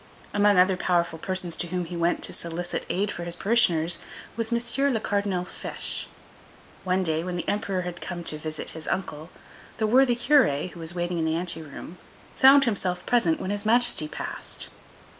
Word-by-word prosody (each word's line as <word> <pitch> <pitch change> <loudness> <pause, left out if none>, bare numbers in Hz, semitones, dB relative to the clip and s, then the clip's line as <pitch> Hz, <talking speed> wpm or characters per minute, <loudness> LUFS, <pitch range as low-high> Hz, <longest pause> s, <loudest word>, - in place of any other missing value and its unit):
Among 205 -1 +4
other 185 +1 +5
powerful 170 -3 0
persons 185 -2 -1
to 175 - -1
whom 180 0 -2
he 175 +1 -7
went 170 +1 0
to - - 0
solicit 170 +1 -4
aid 200 +2 0
for 175 - -6
his 170 0 -1
parishioners 175 -6 +2 0.4
was 230 0 -2
M. 245 +4 +1
le - - +1
Cardinal 200 -4 -1
Fesch. - - -6 0.8
One 185 0 +1
day, 160 -1 0
when 180 0 -4
the 175 - -4
Emperor 200 -3 -1
had 180 -1 -6
come 175 -1 -5
to 155 -2 -2
visit 155 0 -5
his 160 -1 -8
uncle, 160 -4 -3 0.5
the 220 - +1
worthy 245 +2 +4
Curé, 235 - +3
who 175 - -12
was 165 +1 -3
waiting 175 0 -1
in 160 - 0
the 160 0 +1
anteroom, 165 0 -5 0.4
found 275 +1 +7
himself 190 -7 -1
present 205 -10 +2
when 185 - -3
His 205 0 -2
Majesty 235 -7 +3
passed. - - -6
180 Hz, 180 wpm, -26 LUFS, 170-210 Hz, 0.8 s, found